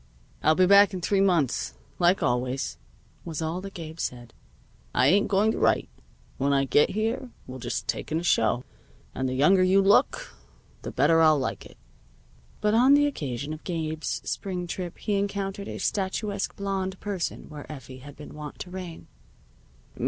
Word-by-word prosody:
"I'll 155 - +4
be 185 - +5
back 200 +1 +6
in 180 - -4
three 195 +2 +2
months, 170 -10 +1 0.2
like 180 +2 +3
always," 125 +2 -1 0.4
was 165 -3 -5
all 165 +3 -2
that 195 0 -9
Gabe 160 -1 -8
said. 120 -4 -5 0.6
"I 125 - +4
ain't 195 +9 +4
going 205 +2 +3
to - - -3
write. - - +2 0.5
When 140 +1 +1
I 135 0 +3
get 145 +2 +4
here 225 +5 -2 0.2
we'll 130 0 -8
just 120 -4 -4
take - - -3
in 160 - +1
a - - -6
show, 120 -6 +2 0.5
and 130 0 -2
the 130 - -2
younger 170 +8 +5
you 185 +2 +5
look 195 +1 +3 0.5
the - - -5
better 165 +5 +3
I'll 155 -1 +6
like 135 - -3
it." - - -19 0.8
But 210 0 +2
on 255 +5 +6
the 290 0 +4
occasion 145 - -3
of 155 - -9
Gabe's 160 -3 -3
spring 180 -3 -3
trip 175 0 -5
he 205 -2 -1
encountered 200 0 -3
a - - -5
statuesque 200 +1 -2
blonde 195 -1 -3
person 195 -5 -4
where 150 -1 -9
Effie 130 -3 -10
had 145 +2 -12
been 150 - -11
wont 150 -1 -8
to 180 - -7
reign. 180 -3 -7
175 Hz, 175 wpm, -26 LUFS, 145-195 Hz, 0.8 s, back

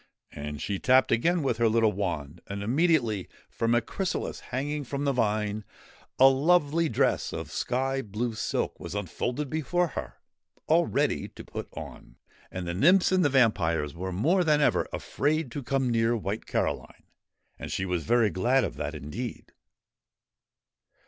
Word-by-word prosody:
And 75 0 -6
she 100 +3 -3
tapped 130 +1 +4
again 165 +8 +2
with 125 -5 0
her 115 -1 +4
little 110 -1 +3
wand, 85 -5 -4
and, 100 0 -5
immediately, 120 - +1 0.2
from 115 +1 +1
a 120 - +3
chrysalis 190 - -3
hanging 145 +4 -3
from 140 +2 -3
the 140 - +2
vine, 105 -3 0 0.5
a 135 - +8
lovely 155 +3 +3
dress - - +1
of - - -6
sky 135 +2 -1
blue 115 +2 -3
silk 110 - -2
was - - -7
unfolded 120 - -3
before 160 +4 0
her, - - -6 0.5
all - - +3
ready - - 0
to - - -12
put - - -6
on. - - -10 0.3
And 90 -1 -5
the 85 - -2
nymphs 180 - +4
and 185 -1 +3
the 145 - +4
vampires 85 - +2
were 95 +2 -5
more 160 - +2
than 155 -3 +3
ever 145 - +2
afraid 150 -1 -1
to 145 - -4
come 130 0 0
near 115 +1 +2
White 105 0 -4
Caroline, - - -2 0.6
and - - -6
she 95 - -1
was 90 -3 -1
very 115 0 +3
glad 125 +8 +2
of - - -4
that 75 +1 -4
indeed. 95 - -6
120 Hz, 160 wpm, -27 LUFS, 100-145 Hz, 0.6 s, a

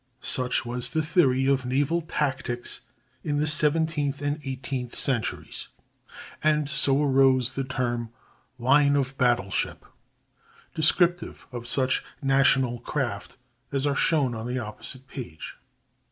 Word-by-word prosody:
Such 125 -1 +1
was 120 0 0
the 160 -1 0
theory 135 -6 +2
of 135 -1 +2
naval 140 +7 0
tactics 135 -6 -2 0.4
in 145 -2 -1
the 150 - +1
seventeenth 150 -1 +2
and 145 +2 -1
eighteenth 130 -2 -5
centuries; 125 -5 -2 0.8
and 150 -1 +2
so 145 -1 +1
arose 130 -2 +3
the 135 - -2
term 120 -3 -2 0.5
line 140 +3 +4
of 135 -1 -1
battle 120 -6 +2
ship, - - -2 0.9
descriptive 175 +2 +2
of 120 -1 -7
such 130 +1 +2 0.2
national 135 -3 +2
craft - - -4 0.3
as 135 0 0
are 145 - +2
shown 140 -3 +2
on 115 0 -5
the 125 +1 -2
opposite 125 +3 -7
page. 90 - -8
135 Hz, 125 wpm, -26 LUFS, 125-145 Hz, 0.9 s, line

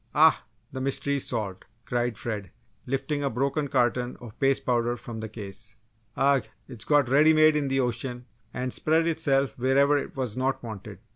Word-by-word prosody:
"Ah! - - +5 0.3
the 130 - -5
mystery's 140 +1 +1
solved!" 100 -6 -4 0.2
cried 120 -2 -1
Fred, 105 -5 -4 0.4
lifting 135 +3 -2
a 140 - +1
broken 140 +4 -1
carton 125 -2 0
of 120 -2 -12
paste 135 -1 +2
powder 120 -1 +1
from 115 -1 -8
the 110 0 -5
case. 105 0 -8 0.4
"Agh! 135 0 +3 0.2
It's 120 -5 -7
got 145 -3 +3
ready 150 +5 +5
made 155 0 +5
in 145 -2 0
the 135 0 +1
ocean 125 0 -3 0.3
and 125 +1 -3
spread 160 +1 +2
itself 140 -6 +1
wherever 140 +3 +3
it - - -7
was 125 -5 -3
not 130 +1 -1
wanted!" 105 -3 -8
130 Hz, 170 wpm, -26 LUFS, 120-140 Hz, 0.4 s, Ah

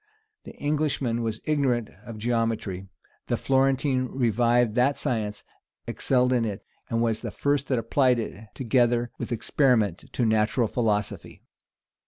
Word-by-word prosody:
The - - -10
Englishman 145 -5 -1
was 110 -1 -3
ignorant 130 -7 0 0.2
of 115 -2 -7
geometry: 115 -4 -1 0.4
the - - 0
Florentine 135 0 +1
revived 120 -2 +2
that 130 +4 +2
science, 110 -6 -2 0.4
excelled 125 -1 +1
in 120 -2 +2
it, 105 -3 -4 0.2
and 115 0 +1
was 110 -2 0
the - - -4
first 140 -1 0
that 130 - +1
applied 125 +2 +2
it, 110 -1 -6
together 120 -1 +1
with - - -5
experiment, 115 - +1
to 120 - 0
natural 110 +2 +2
philosophy. 105 -3 -2
120 Hz, 135 wpm, -26 LUFS, 110-130 Hz, 0.4 s, revived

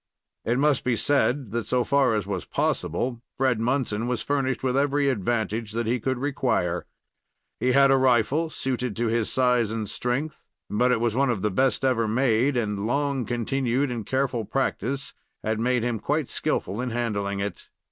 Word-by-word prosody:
It 120 +2 0
must 145 0 +2
be 125 -2 +1
said 130 0 +1
that, 115 0 -2
so 125 -1 +2
far 140 -4 +3
as 105 - 0
it - - -11
was 95 -3 -3
possible, 120 +8 -1 0.2
Fred 130 -4 +2
Munson 120 -2 0
was 125 -2 -1
furnished 135 -3 -1
with 130 -1 +1
every 140 0 +2
advantage 110 -1 -1
that 115 +1 -1
he 120 +3 0
could 130 +3 -1
require. 125 -10 -1 0.7
He 125 0 +2
had 140 0 +6
a 135 - +5
rifle 130 +5 +2
suited 125 -6 -3
to 115 0 0
his 115 -1 0
size 125 -3 +2
and 110 -1 -3
strength, 130 +9 -2 0.3
but 125 +5 +2
it 125 - +2
was 115 -1 0
one 135 +1 +2
of 110 -5 -1
the 105 - +1
best 130 +4 +1
ever 115 -4 +2
made, 125 +3 +2
and 105 -3 -1
long 140 0 0
continued 125 +2 0
and 115 -3 -3
careful 130 0 -1
practice 135 +6 -2 0.3
had 110 0 -1
made 125 0 +1
him 120 -2 -1
quite 145 +5 -1
skillful 100 +6 -1
in 125 - -2
handling 105 -4 -2
it. 100 +1 -5
120 Hz, 185 wpm, -25 LUFS, 110-135 Hz, 0.7 s, had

